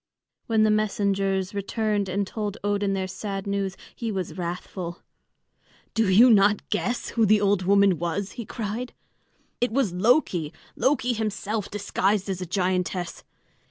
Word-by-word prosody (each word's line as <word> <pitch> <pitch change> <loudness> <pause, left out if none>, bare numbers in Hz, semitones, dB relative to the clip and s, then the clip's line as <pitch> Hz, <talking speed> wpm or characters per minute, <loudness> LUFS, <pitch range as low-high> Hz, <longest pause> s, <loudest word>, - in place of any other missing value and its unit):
When 220 -1 +3
the 215 - +4
messengers 200 -2 0
returned 205 0 -1
and 200 +2 0
told 205 0 -4
Odin 205 -1 0
their 190 -1 -1
sad 195 +1 -5
news, 200 -1 -2 0.2
he 230 -2 -3
was 185 -5 -4
wrathful. 175 0 -5 0.9
"Do 225 -3 +2
you 235 +6 +7
not 205 -1 +4
guess 235 +3 -1
who 230 - +1
the 215 0 +5
old 200 -1 +2
woman 200 -2 +4
was?" 175 +4 -2
he 235 - -6
cried. 225 +3 -5 0.7
"It 245 -1 +1
was 235 -7 +1
Loki 180 - +2 0.2
Loki 260 -2 +1
himself, 215 -1 -2
disguised 200 0 0
as 185 -1 -4
a 180 - -4
giantess. 180 -1 -1
200 Hz, 145 wpm, -25 LUFS, 190-215 Hz, 0.9 s, you